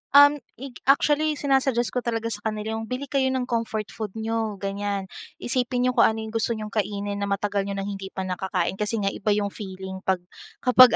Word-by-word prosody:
Um, 285 Hz, +1 st, +9 dB, 0.2 s
ik 260 Hz, +1 st, -9 dB
actually 300 Hz, +2 st, +4 dB
sinasuggest 270 Hz, -4 st, +2 dB
ko 250 Hz, -, 0 dB
talaga 230 Hz, -1 st, -2 dB
sa 205 Hz, -, -2 dB
kanila 220 Hz, +1 st, -2 dB
yung, 225 Hz, -, -6 dB
"Bili 255 Hz, +2 st, -4 dB
kayo 270 Hz, -2 st, +3 dB
ng 260 Hz, -1 st, +1 dB
comfort 230 Hz, -3 st, -2 dB
food 215 Hz, -3 st, -5 dB
n'yo" 225 Hz, -1 st, -1 dB
ganyan. 200 Hz, 0 st, -2 dB, 0.3 s
"Isipin 250 Hz, 0 st, 0 dB
n'yo 255 Hz, -, +4 dB
kung -, -, +6 dB
ano 220 Hz, 0 st, -1 dB
yung 220 Hz, -, -6 dB
gusto 230 Hz, +1 st, 0 dB
n'yong 215 Hz, -1 st, -5 dB
kainin 205 Hz, -1 st, -1 dB
na 200 Hz, -, -1 dB
matagal 200 Hz, 0 st, 0 dB
n'yo 200 Hz, -, -2 dB
nang 195 Hz, -, -2 dB
hindi 195 Hz, -1 st, -5 dB
pa 190 Hz, 0 st, -4 dB
nakakain 185 Hz, 0 st, -1 dB
kasi 210 Hz, +2 st, 0 dB
nga 195 Hz, -, +2 dB
iba 205 Hz, 0 st, +1 dB
yung 205 Hz, -1 st, 0 dB
feeling 190 Hz, -2 st, -6 dB
'pag, 185 Hz, -2 st, +2 dB, 0.4 s
kapag 250 Hz, -2 st, +8 dB
220 Hz, 210 wpm, -25 LUFS, 200-250 Hz, 0.4 s, Um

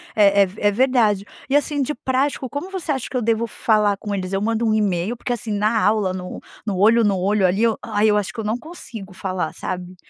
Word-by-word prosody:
é 200 Hz, -1 st, +5 dB
é -, -, +2 dB
v 190 Hz, +3 st, -11 dB
é 205 Hz, -, +4 dB
verdade. 220 Hz, -4 st, +2 dB, 0.2 s
E, 275 Hz, -, +2 dB
assim, 290 Hz, 0 st, +1 dB
de 275 Hz, +3 st, -1 dB
prático 265 Hz, +2 st, -1 dB
como 285 Hz, +8 st, -5 dB
você 375 Hz, -5 st, -3 dB
acha 265 Hz, -4 st, -2 dB
que 255 Hz, -, -2 dB
eu -, -, 0 dB
devo 230 Hz, +1 st, +1 dB
falar 210 Hz, -3 st, +1 dB
com 205 Hz, 0 st, -5 dB
eles? 185 Hz, -2 st, -3 dB
Eu 195 Hz, 0 st, -1 dB
mando 225 Hz, +2 st, 0 dB
um 220 Hz, -, +2 dB
e-mail? 205 Hz, +1 st, 0 dB
Porque, 245 Hz, -, -2 dB
assim, 225 Hz, -2 st, -5 dB
na 210 Hz, +2 st, +1 dB
aula 210 Hz, -3 st, +2 dB
no 180 Hz, -1 st, -6 dB, 0.3 s
no 200 Hz, -4 st, -2 dB
olho 225 Hz, +4 st, +5 dB
no 200 Hz, -3 st, +2 dB
olho 195 Hz, +1 st, +2 dB
ali 195 Hz, +5 st, +1 dB
eu 230 Hz, -2 st, +2 dB
ai, 210 Hz, +1 st, +1 dB
eu 210 Hz, -, +3 dB
acho 205 Hz, -3 st, -1 dB
que 240 Hz, -, -9 dB
eu -, -, -2 dB
não 215 Hz, +2 st, -1 dB
consigo 235 Hz, -, -10 dB
falar, 185 Hz, -3 st, -3 dB
sabe? 180 Hz, 0 st, -5 dB
215 Hz, 250 wpm, -21 LUFS, 195-240 Hz, 0.3 s, é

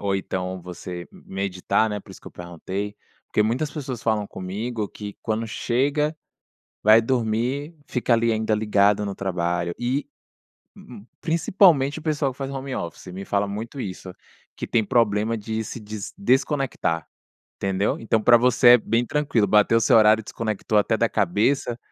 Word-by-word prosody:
ou 100 Hz, -1 st, 0 dB
então 95 Hz, -1 st, -4 dB
você 90 Hz, 0 st, -8 dB
meditar, 95 Hz, +3 st, -1 dB
né, 105 Hz, -1 st, -4 dB
por -, -, -16 dB
isso -, -, -12 dB
que -, -, -20 dB
eu -, -, -7 dB
perguntei, 95 Hz, +4 st, -6 dB, 0.3 s
porque 105 Hz, -, +1 dB
muitas 125 Hz, +8 st, -1 dB
pessoas 130 Hz, -6 st, -6 dB
falam 110 Hz, -2 st, 0 dB
comigo 105 Hz, +4 st, -4 dB
que 105 Hz, -1 st, -9 dB
quando 110 Hz, +1 st, -2 dB
chega, 145 Hz, +7 st, 0 dB, 0.7 s
vai 110 Hz, +2 st, +7 dB
dormir, 125 Hz, +6 st, -1 dB
fica 125 Hz, -1 st, 0 dB
ali, 115 Hz, 0 st, +2 dB
ainda 110 Hz, 0 st, 0 dB
ligado 105 Hz, -1 st, +2 dB
no 100 Hz, -, -3 dB
trabalho, 85 Hz, -2 st, -2 dB
e 130 Hz, +4 st, -1 dB, 0.7 s
uhum, 100 Hz, -, -13 dB
principalmente, 160 Hz, -3 st, +3 dB
o -, -, -12 dB
pessoal 150 Hz, -3 st, 0 dB
que 125 Hz, -, -16 dB
faz 135 Hz, -1 st, -4 dB
home 135 Hz, -1 st, -5 dB
office 85 Hz, +1 st, -6 dB
me 95 Hz, +2 st, -7 dB
fala 100 Hz, 0 st, 0 dB
muito 115 Hz, +7 st, -6 dB
isso, 95 Hz, -1 st, -7 dB, 0.4 s
que -, -, -5 dB
tem 115 Hz, -2 st, +2 dB
problema 115 Hz, -2 st, +2 dB
de 110 Hz, +1 st, -3 dB
se 115 Hz, -, -7 dB
dis 105 Hz, -1 st, -7 dB
desconectar, 135 Hz, -, 0 dB, 0.5 s
entendeu. 95 Hz, +1 st, -1 dB
Então, 110 Hz, -1 st, +1 dB
pra 120 Hz, +2 st, +6 dB
você 125 Hz, 0 st, +5 dB
é 120 Hz, -, +10 dB
bem 115 Hz, +2 st, 0 dB
tranquilo. 140 Hz, -8 st, +1 dB
Bateu 105 Hz, +3 st, +4 dB
seu 120 Hz, +1 st, +4 dB
horário 110 Hz, 0 st, +6 dB
e -, -, -16 dB
desconectou 110 Hz, -1 st, -2 dB
até 110 Hz, +2 st, +1 dB
da 115 Hz, +2 st, +2 dB
cabeça 115 Hz, +7 st, 0 dB
110 Hz, 165 wpm, -23 LUFS, 100-125 Hz, 0.7 s, é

